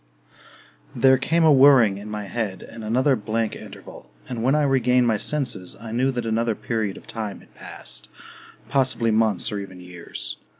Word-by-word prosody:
II - - -7
There 130 0 +6
came 165 +5 +1
a 155 -2 +6
whirring 130 -8 +6
in 105 +1 -9
my 105 -1 -4
head, 100 -1 -4
and 115 - -10
another 130 +5 +2
blank 110 0 -2
interval; - - -12 0.2
and 120 -3 -4
when 130 +5 +2
I 150 - +2
regained 125 -2 +3
my 115 -2 +2
senses 120 -8 -2
I 115 -1 -8
knew 125 +4 +1
that 125 -3 -3
another 115 0 0
period 110 -4 -3
of - - -13
time 110 -3 -6
had - - -22
passed, - - -5 0.6
possibly 125 -4 +1
months 110 0 +2
or 105 - -3
even 95 -2 -9
years. 90 -1 -8
115 Hz, 180 wpm, -23 LUFS, 105-130 Hz, 0.6 s, There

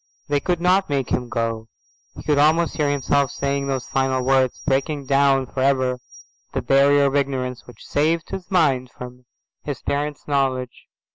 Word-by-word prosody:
They 145 0 +2
could 175 +4 -1
not 185 +2 +2
make 140 -3 -1
him 125 -1 -1
go. 115 -1 -2 0.5
He - - -9
could 145 -2 +1
almost 160 +3 +3
hear 150 -2 +1
himself 140 -1 +1
saying 140 +1 -2
those 135 -2 -2
final 130 -1 0
words, 130 -1 +2
breaking 140 +1 -1
down 135 -1 +3
for 130 - -7
ever 130 -2 +1 0.5
the - - -2
barrier 140 +1 +4
of 140 0 0
ignorance 130 -3 -2
which 125 -3 -14
saved 160 +2 0
his 190 -1 -6
mind 140 -9 +2
from 125 0 -11 0.4
his 145 -4 -5
parents' 145 +1 -3
knowledge. 130 -3 -1
140 Hz, 165 wpm, -22 LUFS, 130-145 Hz, 0.5 s, barrier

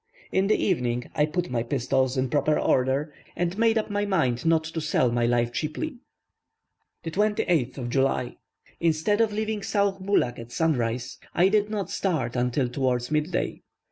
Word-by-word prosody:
In 190 +1 +2
the 215 - +4
evening 125 -9 -1
I 150 - +2
put 175 +1 -2
my 120 -2 0
pistols 130 +1 0
in 130 0 +1
proper 150 +1 +2
order, 135 +4 +1 0.2
and 175 +1 -1
made 225 +1 +3
up 215 -1 -1
my 205 0 0
mind 160 -10 0
not 165 -1 +4
to 160 0 -4
sell 140 -5 +2
my 120 0 +1
life 120 0 +1
cheaply. 200 - -3 1.1
28th 165 - 0
July. 135 -1 0 0.4
Instead 165 +6 +2
of 225 -2 +2
leaving 215 0 -2
Sauh 200 -1 0
Bulak 190 -12 +1
at 115 +1 -9
sunrise, 125 -7 -1 0.2
I 180 +2 +5
did 210 0 +2
not 210 -3 -3
start 155 -11 -1
until 125 +2 +1
towards 125 0 -1
mid 155 +3 0
day. 175 - -2
155 Hz, 165 wpm, -26 LUFS, 125-195 Hz, 1.1 s, I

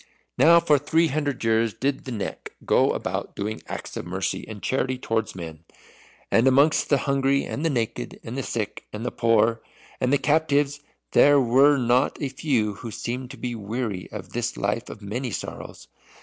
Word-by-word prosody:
Now 170 +2 +7
for 150 -4 +3
three 160 +3 +2
hundred 145 -3 -2
years 115 -1 +2
did 135 0 -2
the 130 - -5
Neck 105 -4 -5
go - - +4
about - - -4
doing 105 +2 -4
acts - - -6
of - - -4
mercy 95 +2 -3
and 110 -2 -8
charity 130 0 0
towards 115 -5 -2
men. 80 -3 -8 0.7
And 115 +3 +4
amongst 140 +4 +4
the 140 - +4
hungry, 140 0 +2
and 145 - -4
the 165 - +2
naked, 115 - -3
and - - -6
the - - -2
sick, - - -4
and 110 +3 -6
the - - -1
poor, 115 0 +2 0.4
and 125 - +1
the 145 - +5
captives, 145 0 +1 0.3
there 145 0 +6
were 135 +3 +5
not 125 0 +2
a 140 - -2
few 130 -6 0
who 115 +4 -8
seemed 125 +4 -5
to - - -10
be 125 -1 -4
weary 110 -3 -4
of 95 -4 -7
this 120 0 -2
life 105 +4 -2
of 105 - -10
many 120 +6 -3
sorrows. - - -7
125 Hz, 185 wpm, -24 LUFS, 110-140 Hz, 0.7 s, Now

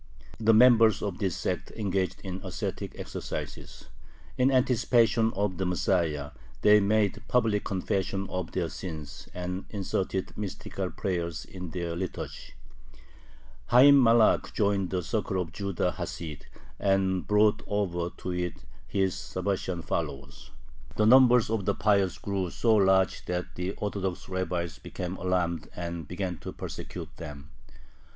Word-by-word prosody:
The 115 0 +4
members 115 -2 +6
of 100 -4 -3
this 95 -4 -1
sect - - -2
engaged 95 -4 -1
in 95 -1 -5
ascetic - - -4
exercises; - - -6 0.5
in 130 +1 +3
anticipation 120 -3 +3
of 100 -2 -1
the 95 - 0
Messiah, 85 -5 0 0.3
they 105 0 +7
made 100 0 +1
public 110 -4 +2
confession 95 0 -1
of 90 -2 -3
their 90 -3 -1
sins 80 -3 -7
and 90 +1 -4
inserted 95 -2 -2
mystical 100 -2 -4
prayers 85 -4 -3
in 90 -2 -8
their 85 -1 -3
liturgy. 95 +1 -6 1.2
Hayyim 135 +3 +8
Malakh 115 -2 +4
joined 100 -3 +1
the 90 -1 -1
circle 100 0 -1
of 85 -2 -3
Judah 100 -1 -1
Hasid, 75 -4 -6 0.3
and 95 -2 +1
brought 105 +1 +4
over 90 -4 -1
to 90 - -4
it 90 -1 -3 0.2
his 95 -2 +1
Sabbatian - - -3
followers. 70 0 -4 0.5
The 105 - +3
number 125 +1 +7
of 110 -3 -1
"the 100 - +1
Pious" 100 -3 +2
grew 95 -3 -2
so 115 +5 +2
large 95 -2 +3
that 90 0 -3
the 90 +2 -3
Orthodox 100 -3 -3
rabbis 90 -3 -3
became 90 0 -5
alarmed 90 -3 -1
and 85 -3 -5
began 90 0 -4
to - - -6
persecute - - -7
them. 75 -2 -9
95 Hz, 135 wpm, -28 LUFS, 90-105 Hz, 1.2 s, Hayyim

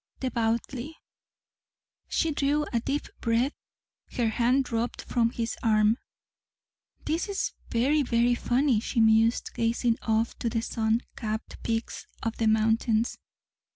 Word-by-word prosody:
"Devoutly." 240 +4 -2 1.1
She 325 - +1
drew 290 +1 +1
a 235 - +3
deep 280 +5 -2
breath. 235 +4 +1 0.6
Her 235 -3 +1
hand 245 +4 +2
dropped 235 0 -2
from 235 -2 +1
his 230 0 -3
arm. 215 0 +3 1.1
"This 330 +6 -1
is 400 - -1 0.2
very, 275 +6 +2
very 240 -2 +2
funny," 245 0 +2
she 235 +2 -2
mused, 225 +1 +4
gazing 230 +1 +1
off 225 +1 0
to 235 - 0
the 225 0 -1
sun 225 0 0
capped 220 -1 -5
peaks 225 0 -3 0.2
of 225 -1 -2
the 225 - +1
mountains. 220 +1 +2
235 Hz, 125 wpm, -27 LUFS, 225-255 Hz, 1.1 s, mused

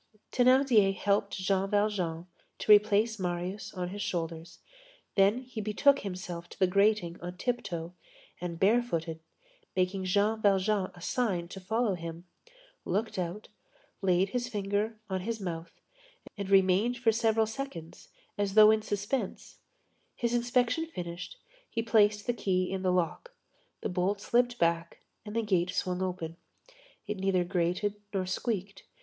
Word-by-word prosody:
Thénardier 250 -6 +4
helped 200 0 +1
Jean 195 0 0
Valjean 195 -6 0 0.3
to - - +1
replace 210 +1 +5
Marius 180 +3 -3
on 180 -1 -3
his 205 +2 -6
shoulders, 165 -2 -4 0.6
then 205 +6 +3
he 245 -3 -6
betook 245 +7 +3
himself 180 -3 -6
to - - -13
the 190 - +4
grating 200 -2 +2
on 180 +1 -6
tiptoe, 180 -8 -3 0.5
and 170 -2 -4
barefooted, 190 -7 +1 0.6
making 185 +1 0
Jean 205 +4 +2
Valjean 195 -1 +2
a 175 - -13
sign 185 -5 -1
to 195 - -8
follow 220 +3 0
him, 170 0 -7 0.6
looked 215 -1 -1
out, 180 +4 -4 0.5
laid 190 0 +2
his 245 +2 -2
finger 205 0 -1
on 190 -1 -2
his 225 +3 -3
mouth, 170 -3 -6 0.6
and 200 -2 -5
remained 195 +5 +4
for 235 -2 +3
several 225 0 +2
seconds, 220 -8 -7 0.3
as 200 -1 0
though 215 0 +9
in 220 0 +2
suspense; 205 +5 -3 0.6
his 235 -1 -1
inspection 245 +5 +1
finished, 175 - -7 0.3
he 230 - -2
placed 210 -2 +3
the 245 - +1
key 185 -5 0
in 190 -1 -2
the 185 -1 +2
lock. 180 - -1 0.5
The - - -2
bolt 185 +2 0
slipped 245 +3 +1
back 170 -2 0 0.2
and 210 - -6
the 230 - +1
gate 185 -4 +1
swung 180 0 -1
open. 175 -3 -3 0.7
It 210 - -3
neither 190 -1 +1
grated 180 +3 -1
nor 190 -2 -1
squeaked. 195 0 -3
200 Hz, 145 wpm, -30 LUFS, 180-220 Hz, 0.7 s, though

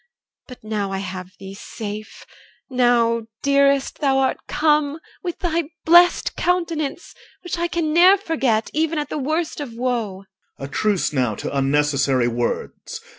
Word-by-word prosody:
But 250 -4 -12
now 210 -2 -2
I 195 - -2
have 185 -1 -6
thee 195 0 -9
safe; 210 +1 -8 0.5
now, 235 -2 +2 0.2
dearest, 280 -1 +2
thou 275 -3 +2
art 265 -1 +1
come, 300 -1 +1 0.2
With 350 -3 -4
thy 335 -2 -1 0.2
blest 345 +2 +5
countenance, 340 -3 -1 0.3
which 355 -1 -4
I 345 - +1
Can 335 -3 -1
ne'er 365 +4 +7
forget, 270 - 0
even 320 +1 0
at 295 - -2
the - - -3
worst 310 +4 -2
of 260 -6 -6
woe. 230 -6 -2 0.3
OR. 135 - -6
A - - -6
truce 180 +6 0
now 125 -6 0
to - - -5
unnecessary 140 -2 +2
words. 120 0 -3
255 Hz, 150 wpm, -21 LUFS, 195-315 Hz, 0.5 s, ne'er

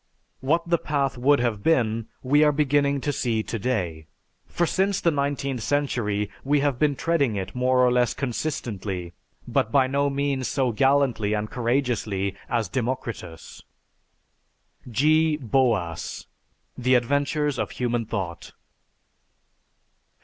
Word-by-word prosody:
What 165 +6 0
the 170 -1 +2
path 140 -3 -1
would 140 +4 +3
have 115 -4 -1
been, 115 -6 +1 0.2
we 145 +4 +4
are 150 - +5
beginning 140 -1 +1
to 145 - -1
see 115 -4 0
to 115 - -4
day, 90 -10 -2 0.4
for 175 - 0
since 195 +3 +1
the 170 - +2
nineteenth 140 -3 -2
century 110 -6 0 0.2
we 145 +1 +2
have 140 -4 0
been 150 -2 +2
treading 140 -8 +1
it 95 -1 -4
more 125 0 +3
or 125 - +3
less 125 -1 +2
consistently 105 - -4 0.3
but 110 - 0
by 135 0 +4
no 140 +2 +1
means 140 -2 -1
so 130 -2 0
gallantly 125 -4 +2
and 105 0 -3
courageously 120 -7 -1
as 115 -2 0
Democritus." 115 -9 -5 1.3
(_G. 155 +6 +2
Boas: 115 - 0 0.5
"The 130 +1 +2
Adventures 145 +3 0
of - - -1
Human 120 -2 -2
Thought." 90 -6 -5
130 Hz, 130 wpm, -25 LUFS, 110-145 Hz, 1.3 s, are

